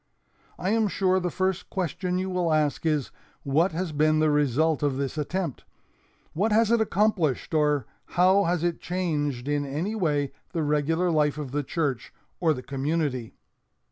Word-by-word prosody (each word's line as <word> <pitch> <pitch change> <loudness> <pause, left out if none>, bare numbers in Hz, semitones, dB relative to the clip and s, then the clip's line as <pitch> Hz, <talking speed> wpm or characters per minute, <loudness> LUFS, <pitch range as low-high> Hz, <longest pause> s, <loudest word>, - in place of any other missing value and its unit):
"I 190 - -1
am 220 -1 +2
sure 190 -1 +2
the 180 -1 -1
first 190 +1 -1
question 180 0 -2
you 185 +1 -1
will 180 -3 0
ask 155 +1 +1
is, 150 -4 0 0.3
'What 155 +7 +2
has 175 0 -2
been 155 +1 +2
the 155 0 +3
result 150 +2 +2
of 145 -3 0
this 140 0 -2
attempt? 160 0 -3 0.7
What 210 +7 +1
has 225 +1 +3
it 235 -1 +4
accomplished 190 - +1
or 150 -4 +2 0.3
how 190 +3 +5
has 170 -1 0
it 175 -1 -1
changed 150 -8 -2
in 145 0 0
any 150 +9 -3
way 150 -9 0 0.2
the 165 -3 0
regular 155 +4 +1
life 150 -2 +2
of 145 -4 -5
the 145 +2 0
church 145 -3 -2 0.3
or 165 -3 +3
the 125 - -7
community?' 140 -2 -2
155 Hz, 170 wpm, -26 LUFS, 145-180 Hz, 0.7 s, how